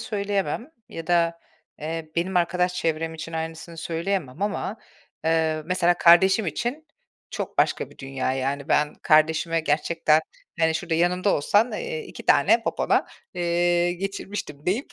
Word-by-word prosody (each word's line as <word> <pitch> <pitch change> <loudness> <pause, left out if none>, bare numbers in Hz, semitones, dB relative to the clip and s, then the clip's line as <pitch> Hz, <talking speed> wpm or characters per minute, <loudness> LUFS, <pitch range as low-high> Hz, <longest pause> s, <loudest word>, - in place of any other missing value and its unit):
söyleyemem 205 +3 -2 0.2
ya 165 -1 -8
da, 170 -1 +2 0.4
eee, 160 +1 -5
benim 180 +2 0
arkadaş 180 +1 +1
çevrem 165 -1 -1
için 160 +1 -7
aynısını 160 +1 -5
söyleyemem 165 -2 -3
ama, 205 +1 -2 0.5
eee, 160 -1 +1
mesela 175 0 +2
kardeşim 190 +4 +6
için, 245 - -3 0.4
çok - - -5
başka - - +1
bir - - -19
dünya 135 -1 -2
yani, 135 +2 -2
ben, 150 -1 +2
kardeşime 160 +2 +3
gerçekten: 155 0 +2 0.4
"hani, 160 0 +3
şurada 165 +1 -2
yanımda 180 +4 +2
olsan, 205 +11 +2
eee, 475 -1 -4
2 - - -11
tane - - +5
popona, - - +1 0.3
eee, 175 0 +1
geçirmiştim" 190 -5 -6
deyip 210 +10 -1
170 Hz, 135 wpm, -24 LUFS, 160-190 Hz, 0.5 s, kardeşim